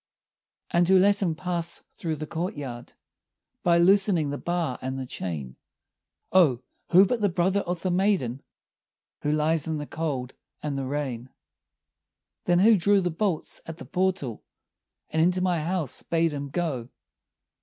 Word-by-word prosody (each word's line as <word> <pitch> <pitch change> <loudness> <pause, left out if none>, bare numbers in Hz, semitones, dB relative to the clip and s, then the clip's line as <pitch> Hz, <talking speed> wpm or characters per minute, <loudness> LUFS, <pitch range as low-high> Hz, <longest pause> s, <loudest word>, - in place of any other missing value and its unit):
"And 175 0 +3
who 190 +1 +6
let 200 +2 +4
him 170 -5 +1
pass 170 -1 -3
through 160 -2 -3
the 155 +1 -5
courtyard, 145 -8 -5 0.7
By 170 -1 +4
loosening 180 -4 +4
the 145 - -4
bar 170 -7 -2
and 130 +1 -3
the 130 - -4
chain?" 75 - -5 0.7
"Oh, 155 -10 +4 0.3
who 185 +3 +8
but 230 +3 -1
the 205 - +3
brother 185 +3 +1
of 175 -3 -3
the 185 - +1
maiden, 175 - +1 0.8
Who 150 - 0
lies 155 0 +1
in 160 -1 -1
the 150 - -4
cold 140 -5 -3 0.3
and 150 -2 -2
the 135 -1 -2
rain!" 130 -3 -3 1.2
"Then 175 -1 +3
who 215 +4 +6
drew 200 +3 +4
the 180 -2 0
bolts 175 0 -2
at 165 0 -7
the - - -9
portal, 180 - -1 0.7
And 160 - +1
into 180 +2 +3
my 180 -2 +1
house 165 -4 -2
bade 165 -1 +1
him 140 -1 -4
go?" 135 -7 -2
165 Hz, 155 wpm, -26 LUFS, 140-185 Hz, 1.2 s, who